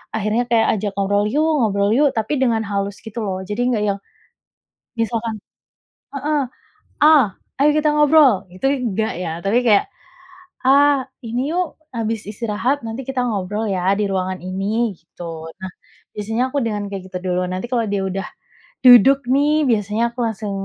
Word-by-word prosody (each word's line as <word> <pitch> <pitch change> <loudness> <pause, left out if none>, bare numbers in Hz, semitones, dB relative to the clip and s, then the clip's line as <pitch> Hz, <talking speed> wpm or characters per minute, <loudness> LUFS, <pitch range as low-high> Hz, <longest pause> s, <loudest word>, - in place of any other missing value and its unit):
akhirnya 220 +3 0
kayak 225 -1 +4
ajak 205 -1 -2
ngobrol 205 +1 +1
yuk 310 +2 +2
ngobrol 200 -3 +1
yuk, 290 0 +4
tapi 220 +5 -1
dengan 230 -3 +2
halus 200 0 -2
gitu 220 +1 -6
loh. 190 -1 -3
Jadi 210 +4 -2
nggak 210 - 0
yang, 200 0 -2 1.0
misalkan 230 0 -1 0.8
heeh, 290 +2 -1 0.6
"A! 300 - +8 0.5
Ayo 290 +2 +4
kita 305 0 +2
ngobrol" 290 -9 +5
gitu 185 +9 -3
enggak 225 -6 -1
ya. 180 -2 -3
Tapi 200 +6 +1
kayak, 210 -3 +5 0.8
"A 280 0 +4 0.2
ini 245 +6 -2
yuk, 360 -2 -1 0.2
habis 225 -1 -2
istirahat 230 +6 -2
nanti 235 +4 -5
kita 265 -1 -2
ngobrol 210 -1 -2
ya 185 0 +1
di 210 - +1
ruangan 185 -1 -2
ini," 200 +3 -1
gitu. 165 -1 -9
Nah, 190 -1 -6 0.5
biasanya 220 +4 -1
aku 285 - -2
dengan 210 -2 -2
kayak 195 -2 -7
gitu 180 - -3
duluan, 180 0 -1
nanti 185 +6 -4
kalau 235 -3 0
dia 200 -1 -1
udah, 190 +1 -3 0.6
duduk 255 +1 +7
nih 295 +3 +3
biasanya 210 0 0
aku 245 - -12
langsung 215 -2 -4
220 Hz, 160 wpm, -20 LUFS, 200-255 Hz, 1.0 s, A